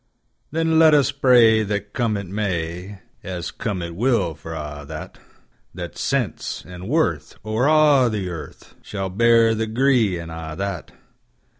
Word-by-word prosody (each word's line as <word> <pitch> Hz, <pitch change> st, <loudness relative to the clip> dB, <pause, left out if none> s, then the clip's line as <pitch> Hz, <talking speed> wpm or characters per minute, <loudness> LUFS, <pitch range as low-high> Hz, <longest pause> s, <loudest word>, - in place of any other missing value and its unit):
Then 160 Hz, +1 st, +1 dB
let 160 Hz, -2 st, +7 dB
us 140 Hz, -4 st, +3 dB
pray 120 Hz, -5 st, +5 dB
that 105 Hz, -1 st, -3 dB
come 115 Hz, -4 st, 0 dB
it 100 Hz, -, -5 dB
may,(As 90 Hz, -1 st, -5 dB
come 100 Hz, -6 st, -4 dB
it 85 Hz, 0 st, -6 dB
will 105 Hz, -6 st, +1 dB
for 80 Hz, +1 st, -9 dB
a' 75 Hz, -1 st, -6 dB
that,)That -, -, -11 dB
Sense -, -, -2 dB
and 90 Hz, +2 st, -8 dB
Worth, 85 Hz, -, 0 dB
o'er 110 Hz, +5 st, +1 dB
a' 150 Hz, -5 st, +5 dB
the 105 Hz, -4 st, -3 dB
earth, 80 Hz, -5 st, -9 dB
Shall 95 Hz, -2 st, -5 dB
bear 115 Hz, +2 st, +4 dB
the 110 Hz, 0 st, -2 dB
gree, 115 Hz, -5 st, +2 dB
an' 85 Hz, -1 st, -8 dB
a' 80 Hz, -1 st, -6 dB
that. 100 Hz, 0 st, -4 dB
105 Hz, 145 wpm, -22 LUFS, 85-120 Hz, -, let